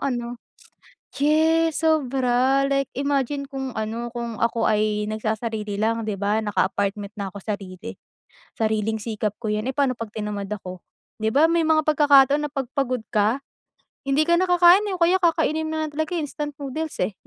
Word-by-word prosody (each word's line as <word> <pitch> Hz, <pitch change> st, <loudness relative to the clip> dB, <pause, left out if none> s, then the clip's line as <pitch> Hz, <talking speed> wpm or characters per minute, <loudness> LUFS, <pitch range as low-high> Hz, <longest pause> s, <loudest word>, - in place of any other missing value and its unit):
ano 240 Hz, -2 st, -3 dB, 0.8 s
yes 320 Hz, +3 st, +2 dB
sobra! 265 Hz, -4 st, +2 dB
Like 275 Hz, -1 st, 0 dB
imagine 280 Hz, 0 st, -1 dB
kung 265 Hz, -2 st, -5 dB
ano 225 Hz, +2 st, -4 dB
kung 235 Hz, -2 st, -5 dB
ako 230 Hz, 0 st, +1 dB
ay 210 Hz, 0 st, +1 dB
nagsasarili 215 Hz, -1 st, -3 dB
lang 225 Hz, +1 st, 0 dB
di 215 Hz, -, -2 dB
ba, 205 Hz, +2 st, +1 dB
naka 205 Hz, -, +1 dB
apartment 200 Hz, 0 st, -2 dB
na 195 Hz, -2 st, -4 dB
ako 200 Hz, -, -7 dB
sarili, 195 Hz, -3 st, -6 dB, 0.6 s
sariling 220 Hz, 0 st, -1 dB
sikap 215 Hz, -1 st, -2 dB
ko 220 Hz, -, -2 dB
yan, 210 Hz, +1 st, -1 dB
eh. -, -, -16 dB
Pano 275 Hz, -3 st, +1 dB
pag 230 Hz, -2 st, -6 dB
tinamad 210 Hz, -2 st, -4 dB
ako 185 Hz, -3 st, -6 dB, 0.3 s
di 220 Hz, 0 st, -1 dB
ba, 300 Hz, +4 st, +5 dB
may 335 Hz, 0 st, +2 dB
mga 315 Hz, 0 st, +4 dB
pagkakataon 285 Hz, -1 st, +5 dB
na -, -, -18 dB
pag 270 Hz, -3 st, -2 dB
pagod 255 Hz, -3 st, 0 dB
ka 215 Hz, +4 st, +2 dB, 0.7 s
hindi 280 Hz, +3 st, +3 dB
ka 340 Hz, +1 st, +3 dB
na 370 Hz, -, +1 dB
kakain, 355 Hz, +3 st, +6 dB
eh, 390 Hz, -, -2 dB
o -, -, -19 dB
kaya 360 Hz, +2 st, +4 dB
kakainin 315 Hz, -2 st, +1 dB
mo 315 Hz, -, -3 dB
na -, -, -1 dB
lang 295 Hz, -, -9 dB
talaga, 315 Hz, +4 st, -2 dB
eh, 330 Hz, -, -1 dB
instant 295 Hz, 0 st, -5 dB
noodles, 295 Hz, +3 st, -5 dB
eh, 210 Hz, -, -3 dB
255 Hz, 185 wpm, -23 LUFS, 215-300 Hz, 0.8 s, kakain